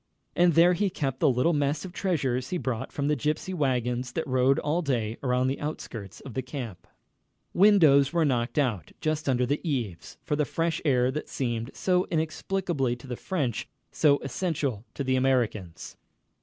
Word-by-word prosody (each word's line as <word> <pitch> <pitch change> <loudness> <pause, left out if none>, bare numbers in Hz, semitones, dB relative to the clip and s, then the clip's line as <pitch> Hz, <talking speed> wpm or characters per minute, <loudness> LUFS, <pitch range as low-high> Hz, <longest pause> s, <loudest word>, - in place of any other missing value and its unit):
And 175 -2 +4
there 175 +2 +6
he 200 +2 +1
kept 135 -7 -3
the 155 - +4
little 130 +7 +2
mess 145 +1 0
of 180 - -8
treasures 135 -11 -1
he 180 - -1
bought 130 -5 -3
from 140 -1 -2
the 150 - +2
gypsy 150 +7 -2
wagons 125 -5 -1
that 160 - -2
rode 130 0 +3
all 155 +4 0
day 120 -7 -1
around 125 -1 +1
the 135 +1 -1
outskirts 115 - -6
of 135 - -9
the 130 - -1
camp. 125 - -7 0.7
Windows 160 -9 +6
were 170 -2 +2
knocked 120 -2 0
out, 115 - 0
just 155 -2 -1
under 125 -1 +2
the 145 +4 -1
eaves, 115 - -3
for 150 - -1
the 150 - +1
fresh 165 +4 -1
air 125 -3 +3
that 150 +3 -5
seemed, 120 -2 -2
so 180 -1 +1
inexplicably 160 -4 -1
to 120 - -14
the 125 -2 -4
French, 140 - -2 0.2
so 145 -2 +4
essential 140 - -2
to 140 - -2
the 130 -1 +1
Americans. 120 -9 -1
140 Hz, 180 wpm, -27 LUFS, 125-160 Hz, 0.7 s, there